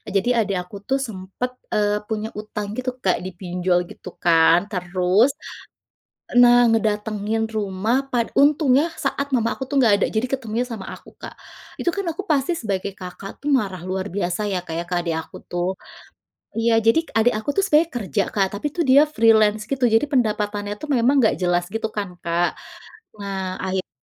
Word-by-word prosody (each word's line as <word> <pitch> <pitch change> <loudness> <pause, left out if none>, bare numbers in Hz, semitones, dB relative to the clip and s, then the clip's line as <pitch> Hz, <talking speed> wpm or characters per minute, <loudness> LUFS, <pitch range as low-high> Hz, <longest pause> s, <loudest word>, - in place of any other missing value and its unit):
jadi 195 +5 +2
adik 195 -2 -2
aku 180 +3 -12
tuh 270 - +2
sempat, 195 +4 -5 0.2
eee, 210 0 +1
punya 220 -1 -2
utang 210 -1 -5
gitu 255 0 -2
kak 185 - +2
dipinjol 180 -1 -1
gitu - - -10
kan 165 0 +5
terus, 185 +6 +2 1.1
nah 245 0 +7
ngedatangin 215 0 0
rumah 205 +3 0
pad 235 -2 +1
untungnya 285 -1 +4 0.2
saat 280 +1 -1
mama 230 -1 +1
aku - - -7
tuh 285 - -3
enggak 245 -6 +5
ada - - +3
jadi 220 - +2
ketemunya 240 -3 -1
sama 205 -4 -6
aku - - -15
Kak, - - -8 0.5
itu 345 - +1
kan 395 - -2
aku 395 - -5
pasti 280 +3 +2
sebagai 200 -4 -3
Kakak 185 +1 -8
tuh - - -1
marah 190 -6 -4
luar 190 +1 -2
biasa 180 -1 -1
ya 185 - 0
Kak 160 - -5
ya - - -5
ke - - 0
adik 170 -2 -2
aku 160 - -12
tuh, 175 +1 -1 0.9
iya 230 +1 +2
jadi 230 +8 +5 0.2
adik 230 +2 +4
aku 215 - -7
itu 395 - +2
sebenarnya 315 +1 +4
kerja 190 - -1
Kak 195 -2 +2
tapi 205 - -7
itu 340 - -2
dia 275 +2 +8
freelance 220 -2 +4
gitu 270 -2 -1
jadi 225 - +3
pendapatannya 210 -4 0
itu - - -6
memang 245 +3 +3
enggak 225 -4 +3
jelas 175 -1 +2
gitu 225 0 -1
kan 200 -2 -2
Kak, 170 +1 +1 0.7
nah 195 -2 -4
akhirnya 190 0 -2
210 Hz, 175 wpm, -22 LUFS, 185-245 Hz, 1.1 s, dia